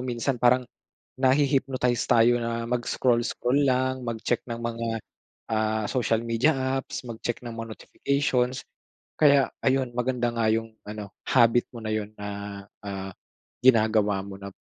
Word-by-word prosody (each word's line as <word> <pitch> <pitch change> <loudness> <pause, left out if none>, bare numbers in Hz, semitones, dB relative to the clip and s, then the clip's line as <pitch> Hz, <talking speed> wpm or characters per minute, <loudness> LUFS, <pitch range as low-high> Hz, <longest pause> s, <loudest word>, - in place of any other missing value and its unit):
minsan 125 0 -2
parang, 125 +1 +4 0.6
nahi-hypnotize 130 -2 +2
tayo 120 0 +5
na 115 0 -2
mag 120 +1 -1
scroll-scroll 125 +2 +1
lang, 130 0 +1
mag-check 115 +1 -1
ng 115 - -3
mga, 115 0 -3 0.6
ah, 110 0 +1
social 115 -3 +1
media 115 +7 +2 0.3
apps, - - -6
mag 115 -2 -7
check 120 - -1
ng 120 - -5
mga 115 0 -6
notifications. 130 -2 -1 0.5
Kaya 140 -3 +5 0.2
ayun, 130 -2 +2
maganda 125 -1 0
nga 115 -2 +1
yung 115 0 -1 0.2
ano 105 -1 -7 0.2
habit 120 -1 +4
mo 120 - -8
na 110 - -2
yun 105 0 -3
na, 105 0 -5 0.6
ah, 95 -1 -5 0.5
ginagawa 110 -5 +4
mo 100 -1 -8
na, 100 0 -7
120 Hz, 145 wpm, -26 LUFS, 110-130 Hz, 0.6 s, tayo